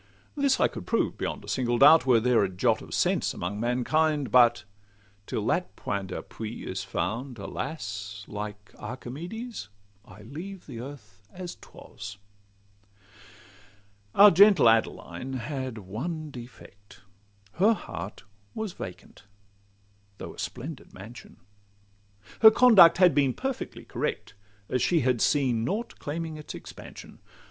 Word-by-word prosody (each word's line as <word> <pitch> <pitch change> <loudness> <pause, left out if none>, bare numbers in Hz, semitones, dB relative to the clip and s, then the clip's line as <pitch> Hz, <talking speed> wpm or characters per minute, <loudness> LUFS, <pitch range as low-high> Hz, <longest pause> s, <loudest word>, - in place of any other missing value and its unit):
This 280 -2 +2
I - - +5
could - - -9
prove - - +1
beyond - - -4
a - - -16
single 120 -2 0
doubt, 145 +3 +7
Were 120 -3 +6
there 120 -1 +3
a 95 - 0
jot 90 -1 +1
of - - -12
sense - - +1
among 95 +4 -4
mankind; 140 +5 +1
But 120 -1 +5 0.6
till - - -3
that - - -1
point 100 -1 -3
d'appui 110 +4 -7
is 95 0 -4
found, 125 +3 -3
alas! 100 - -6
Like 105 0 -7
Archimedes, 145 - -7 0.3
I 100 +1 -15
leave 170 - -9
earth 115 -6 -10
as 180 -1 -7
'twas. 100 -1 -11 2.0
Our 205 +1 +9
gentle 195 - +7
Adeline 115 +3 0
had 130 -1 -4
one 145 - -5
defect— 105 -6 -13 0.6
Her 205 +6 +5
heart 95 - -7 0.3
was 220 -4 -4
vacant, 90 +2 -10 0.9
though - - -8
a - - -15
splendid 135 +4 -7
mansion; 110 +6 -12 1.0
Her 220 - +10
conduct 220 -7 +7
had 180 -3 +6
been 135 -3 +2
perfectly 270 -1 -5
correct, - - -4 0.3
As 125 - -1
she 170 -3 +3
had 125 -2 +1
seen 130 -6 +2
nought 210 - -3
claiming 160 +1 -4
its 150 0 -8
expansion. - - -11
125 Hz, 130 wpm, -27 LUFS, 105-165 Hz, 2.0 s, Her